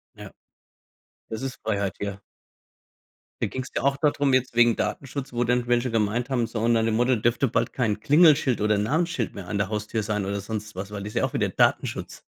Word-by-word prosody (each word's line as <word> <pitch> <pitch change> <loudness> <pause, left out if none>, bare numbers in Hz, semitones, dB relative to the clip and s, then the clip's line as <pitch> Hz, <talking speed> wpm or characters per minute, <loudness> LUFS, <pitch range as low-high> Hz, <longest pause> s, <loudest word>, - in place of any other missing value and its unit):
Ja. - - -10 1.0
Das 110 +1 -5
ist 135 -1 -4
Freiheit, 100 -3 -1
ja. 100 -1 -4 1.2
Da - - +2
ging 130 - -4
es - - -11
ja - - -2
auch 140 0 +3
da 145 +1 +2
drum, 140 -2 +1
jetzt 130 0 +1
wegen 120 -1 +5
Datenschutz, 135 0 -4
wo 120 0 0
dann 125 0 +1
welche 120 0 +1
gemeint 115 +3 0
haben, 125 -3 +1
so 115 0 -5
und 115 +2 +2
nach 115 -1 +2
dem 110 -1 +1
Motto 125 +2 +3
dürfte 120 +4 +1
bald 115 0 0
kein 115 -5 -1
Klingelschild 150 -4 +5
oder 105 0 +2
Namensschild 145 - 0
mehr 95 -3 -8
an 100 - -2
der 100 -1 0
Haustür 105 +1 -2
sein 105 -2 -2
oder 100 +1 -2
sonst 105 0 -6
was, 95 +2 -6
weil 100 -1 -5
das 105 - -6
ist - - -15
ja - - 0
auch - - -4
wieder - - +1
Datenschutz. - - 0
115 Hz, 225 wpm, -25 LUFS, 105-130 Hz, 1.2 s, wegen